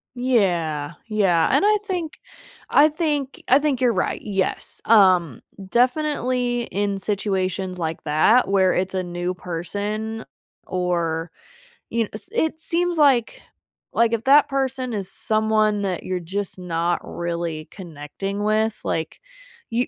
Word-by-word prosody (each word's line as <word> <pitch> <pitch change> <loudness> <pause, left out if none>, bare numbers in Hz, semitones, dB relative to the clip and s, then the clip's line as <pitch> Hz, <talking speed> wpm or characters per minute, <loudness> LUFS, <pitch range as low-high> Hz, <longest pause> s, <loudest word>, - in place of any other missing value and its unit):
Yeah, 175 - 0
yeah. 195 -7 +2
And - - +3
I 425 +1 +5
think 350 -5 -3 0.5
I 295 +2 +6
think 300 -4 -2
I 260 - +6
think 290 -3 0
you're 250 -2 +3
right, - - -1
yes, 195 -2 -2
um, 185 - +4 0.3
definitely 250 -2 +1
in 200 -2 -2
situations 190 -2 -2
like 165 -1 -3
that 175 +10 +4
where 190 -2 +3
it's 190 +1 -1
a 185 - 0
new 175 0 -3
person 205 +6 -4 0.4
or, 170 -2 -1 0.6
y 230 - -3
kn 225 - 0
s 215 +11 -9
it 320 -8 0
seems 340 +1 -1
like, 270 -6 +3 0.5
like 230 0 +3
if 230 -1 -1
that 285 +2 +6
person 265 -2 -2
is 195 -3 -4
someone 215 0 +1
that 185 -3 -2
you're 185 -1 -2
just 190 +3 -5
not 175 -1 -1
really 170 -2 -4
connecting 190 +3 -6
with, 215 +1 +1
like, 160 -1 -3 0.5
y 240 +2 0
205 Hz, 135 wpm, -22 LUFS, 180-250 Hz, 0.6 s, I